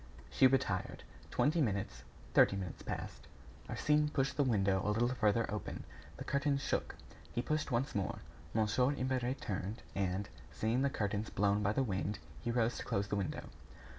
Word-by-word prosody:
She 130 - +6
retired. 125 -8 0 0.3
Twenty 155 +3 +2
minutes, 100 - -1 0.3
thirty - - +6
minutes 95 -3 -5
passed. - - -5 0.4
Arsène 150 0 +2
pushed 135 -1 0
the 145 - +3
window 100 -6 +2
a - - 0
little 115 +3 +2
farther 115 -2 +2
open. 105 - -4 0.3
The - - -5
curtains 140 0 +1
shook. - - -1 0.4
He 120 - -1
pushed 155 0 0
once 125 +4 0
more. 100 -3 -1 0.4
Mon. 115 +6 +3
Imbert 130 -1 -1
turned, 105 +3 -3
and, 95 0 -1 0.2
seeing 115 +4 0
the 140 - +3
curtains 105 -3 -1
blown 100 +1 +2
by 105 +1 +2
the 135 - +2
wind, 100 -2 -1 0.2
he 120 - -3
rose 120 0 +1
to - - -4
close 100 0 -1
the - - 0
window. 100 -3 -2
110 Hz, 165 wpm, -35 LUFS, 100-130 Hz, 0.4 s, She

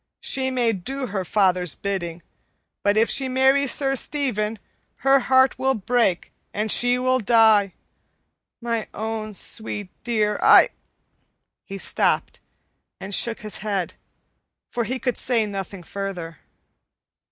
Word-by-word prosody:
She 260 0 -1
may 245 -3 +1
do 260 +8 -4
her 195 -5 -3
father's 180 -3 +1
bidding, 175 -4 -4 0.6
but 205 +1 +2
if 225 +1 +4
she 265 -1 +1
marries 265 +1 +3
Sir 270 -1 +1
Stephen, 230 -7 -1 0.5
her 275 0 +6
heart 260 0 +3
will 265 0 +2
break 220 -4 0 0.2
and 215 0 +1
she 245 +1 +2
will 255 +1 +1
die. 220 -3 +4 0.8
My 230 -2 -2
own 220 -1 -4
sweet 205 -1 -5
dear, 215 -3 0
I - - +7 0.5
" - - -49
He 195 - -5
stopped - - 0 0.6
and 195 +1 -6
shook 230 +3 +1
his 215 -1 -4
head, 200 -3 -2 0.8
for 235 -1 -1
he 260 +3 -2
could 250 0 -2
say 235 -4 +1
nothing 195 -2 -6
further. 180 -4 -6
220 Hz, 130 wpm, -23 LUFS, 200-255 Hz, 0.8 s, I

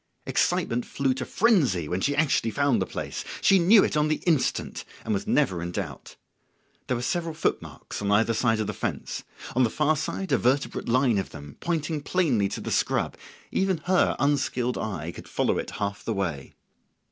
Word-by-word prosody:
Excitement 120 +1 +1
flew 135 -2 0
to 130 - -4
frenzy 145 - +2
when 90 +4 -2
she 145 +6 +1
actually 145 -6 +2
found 140 -3 +2
the 95 - -1
place. - - -5 0.2
She 195 - +5
knew 195 +4 +7
it - - 0
on 150 0 +3
the 155 - +2
instant, 160 -6 0 0.2
and - - 0
was - - -2
never 90 -3 +2
in 85 0 -4
doubt. 85 -8 -6 0.7
There 125 - 0
were 120 - -4
several 165 +3 -1
footmarks 160 - -3
on 100 - -1
either 110 +3 +3
side 115 0 +2
of 110 - 0
the - - -3
fence; - - -4 0.3
on 130 - +4
the 120 - +3
far 150 +5 +2
side 165 +4 -3
a - - +4
vertebrate 135 +1 0
line 125 -3 +3
of 95 - -4
them, 70 -2 -10
pointing 160 -2 -1
plainly 140 - +1
to - - -5
the - - -4
scrub; - - +1 0.4
even 190 -2 +1
her 185 0 +3
unskilled 130 -3 +1
eye 85 -6 -4
could - - -11
follow - - 0
it - - -4
half 100 -1 -3
the 115 - -2
way. 85 -9 -3
125 Hz, 195 wpm, -26 LUFS, 100-155 Hz, 0.7 s, knew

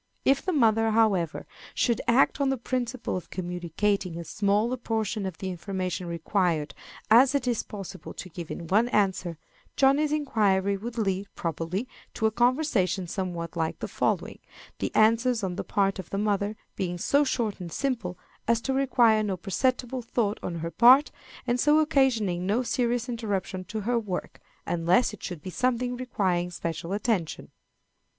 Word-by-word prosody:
If 275 0 +4
the 375 - 0
mother, 225 -7 +3
however, 205 -7 +1 0.3
should 235 -3 +1
act 265 +3 +3
on 275 - +2
the 270 - 0
principle 250 0 -3
of 180 - -6
communicating 180 +1 -2
as 170 -2 -7
small 210 +3 +1
a - - -2
portion 220 -3 -2
of 180 -4 -6
the 190 +1 -4
information 185 0 -4
required 170 -2 0 0.4
as 255 +5 +7
it 270 -3 0
is 240 -3 +1
possible 195 -2 -8
to - - -7
give 170 -1 -8
in 170 - -6
one 210 +8 +3
answer, 190 -6 0 0.4
Johnny's 280 +2 +3
inquiry 205 -10 +1
would 230 +4 -6
lead, 195 -2 -1
probably, 170 - -3 0.3
to 220 - -1
a 220 - +3
conversation 240 - +1
somewhat 175 -2 -4
like 160 -1 -1
the - - -5
following, - - -1 0.4
the - - -2
answers 230 +1 +3
on 185 -2 -2
the - - -3
part 195 -1 0
of 185 - -7
the 195 - -3
mother 205 0 0 0.2
being 180 -2 -2
so 280 +11 +3
short 235 -7 -1
and 175 -2 -7
simple 230 - -2 0.3
as 235 -1 +3
to 265 - -1
require 245 -5 +4
no 200 -3 -1
perceptible 250 +6 -1
thought 225 -3 -1
on 175 - -4
her 165 - -4
part, 255 - +6 0.3
and 245 0 0
so 295 +4 +4
occasioning 235 - +2
no 225 +6 +1
serious 240 0 0
interruption 205 -6 -3
to 215 +3 -4
her 235 +3 +1
work, 195 -5 -5 0.3
unless 175 +7 +2
it 210 - -11
should 175 -5 -6
be 185 - -6
something 250 +2 0
requiring 190 -8 -1
special 170 0 -5
attention. 200 -5 -1
210 Hz, 170 wpm, -27 LUFS, 185-245 Hz, 0.4 s, as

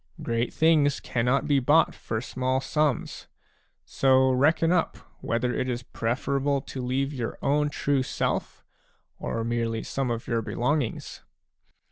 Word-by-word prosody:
Great 115 +1 -1
things 150 -3 +3
cannot 125 +3 0
be 145 -2 +3
bought 150 +5 +4
for 110 - -4
small 130 +1 -1
sums; 145 0 -1 0.6
so 130 -1 +3
reckon 155 +6 +3
up 180 -2 +1 0.2
whether 120 +2 -1
it 130 - -1
is 120 0 -3
preferable 135 +5 -1
to 130 -1 -7
leave 135 +3 -1
your 120 -4 -4
own 150 +1 +2
true 140 -1 0
self, 130 - -2 0.6
or 115 - -3
merely 115 -1 -1
some 135 -2 -2
of 115 -1 -3
your 115 -2 0
belongings. 125 +3 -2
130 Hz, 135 wpm, -26 LUFS, 120-145 Hz, 0.6 s, bought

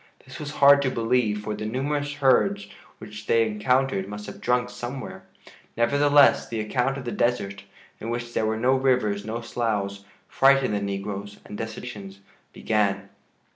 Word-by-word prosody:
This - - -10
was 150 0 -6
hard 140 0 +6
to 135 - +1
believe, 115 -3 0
for 105 - -3
the 110 - -4
numerous 145 +4 -2
herds 145 +9 +2 0.3
which 105 -1 -10
they 115 0 +4
encountered 110 -1 0
must 105 +1 -7
have - - -10
drunk 125 0 0
somewhere. 125 +2 -7 0.5
Nevertheless, 145 +4 +4
the 115 - -3
account 125 +5 -1
of 135 - -7
the 120 - -3
desert, 100 -6 -1 0.3
in 115 - -6
which 120 0 -4
there 110 - 0
were 110 0 -1
no 125 +4 +2
rivers 125 -6 +1
nor 115 +2 -4
sloughs, 105 -4 -2 0.2
frightened 135 -4 +3
the 100 - -1
negroes 100 +1 -5
and - - -9
desertions 105 -3 -7 0.3
began. 100 -2 -1
115 Hz, 160 wpm, -25 LUFS, 105-130 Hz, 0.5 s, hard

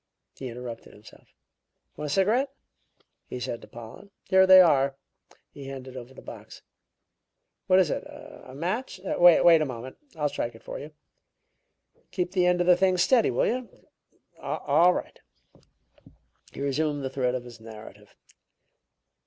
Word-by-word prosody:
He 130 - -7
interrupted 120 -1 -8
himself. 105 +1 -17 0.7
"Want 150 0 -5
a - - -1
cigarette?" 225 +8 +2 0.8
he 125 - -6
said 120 -1 -5
to - - -13
Pollen. 120 - -12
"Here 190 0 +4
they 185 0 +9
are." 140 -6 +4 0.6
He 140 - -11
handed 130 -1 -8
over 125 0 -9
the 130 - -14
box. - - -11 1.0
"What 185 - +5
is 190 - +3
it? - - -3
A - - -13
match? 190 - -3
Wait 175 -3 +6
a - - +1
moment; 125 0 -8 0.2
I'll 150 -2 0
strike 120 -4 -4
it 115 - -16
for - - -7
you. 145 - -9 1.2
Keep 180 -1 -3
the 180 -2 +2
end 180 0 +2
of - - +1
the 180 0 +6
thing 185 0 +2
steady, 230 +6 +3
will - - +1
you? 250 0 -2 0.7
All 175 +2 +2
right." - - -6 1.3
He - - -9
resumed 145 +1 -1
the 130 - -2
thread 125 -2 -1
of 125 - -4
his 120 -2 -12
narrative. 110 -1 -13
150 Hz, 155 wpm, -26 LUFS, 125-185 Hz, 1.3 s, they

